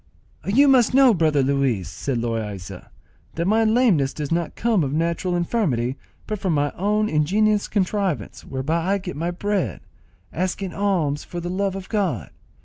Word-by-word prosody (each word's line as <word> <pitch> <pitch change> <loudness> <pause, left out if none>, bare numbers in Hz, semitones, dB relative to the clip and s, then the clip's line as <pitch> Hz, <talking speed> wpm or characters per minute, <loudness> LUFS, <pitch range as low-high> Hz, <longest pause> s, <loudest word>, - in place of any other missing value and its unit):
"You 265 +9 +5
must 255 -3 +4
know, 265 -3 +7
brother 155 -6 +2
Luis," 130 - 0
said 120 - -3
Loaysa, 105 -6 -4 0.5
"that 170 - -1
my 220 +4 +3
lameness 215 - +3
does 150 -1 -4
not 170 -1 -1
come 225 -7 +1
of 135 - -2
natural 170 +3 0
infirmity, 160 - 0 0.3
but 215 -1 -4
from 185 -3 0
my 145 -1 +1
own 210 +3 0
ingenious 205 +6 +2
contrivance, 190 - -1
whereby 160 +8 -1
I - - +2
get 185 -2 -6
my 165 +4 -2
bread, 200 +2 -2 0.5
asking 185 +1 -2
alms 175 -8 0
for 175 - -6
the 175 +1 -4
love 195 0 -1
of 195 -1 -7
God. 180 - -1
175 Hz, 160 wpm, -23 LUFS, 140-205 Hz, 0.5 s, know